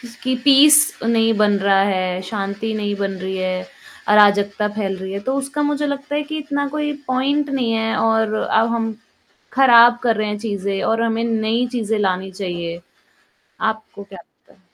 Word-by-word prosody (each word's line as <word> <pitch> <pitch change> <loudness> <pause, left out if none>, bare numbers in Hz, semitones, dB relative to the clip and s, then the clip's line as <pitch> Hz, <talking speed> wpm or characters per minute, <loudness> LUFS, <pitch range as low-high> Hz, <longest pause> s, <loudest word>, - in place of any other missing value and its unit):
किस 240 -1 -12
कि 260 0 0
पीस 290 +1 +7 0.3
नहीं 225 0 +2
बन 210 -1 +3
रहा 195 0 +3
है, 185 -2 -1
शांति 200 +2 -4
नहीं 205 -1 -2
बन 195 -1 -2
रही 190 0 -4
है, 185 0 -3 0.4
अराजकता 205 0 +4
फैल 195 -3 -2
रही 190 +1 -6
है, 200 - -3
तो 260 +6 -3
उसका 275 +2 -3
मुझे 295 0 -1
लगता 285 0 -4
है 295 - 0
कि 310 +1 -6
इतना 285 -1 -3
कोई 295 +1 -3 0.2
पॉइंट 280 +3 0
नहीं 250 -4 -1
है 225 0 -1
और 225 -1 +1
अब 220 +1 +1
हम 225 -1 -2 0.6
ख़राब 240 -2 +6
कर 230 -2 +2
रहे 215 0 -1
हैं, 210 0 -4
चीज़ें 200 -2 -3
और 225 +1 0
हमें 230 0 -1
नई 225 +1 0
चीज़ें 225 -3 -1
लानी 190 -1 -1
चाहिए। 175 -3 -5 0.8
आपको 220 -2 -4
क्या 195 -2 -13
लगता - - -29
है? - - -30
220 Hz, 185 wpm, -19 LUFS, 200-255 Hz, 0.8 s, पीस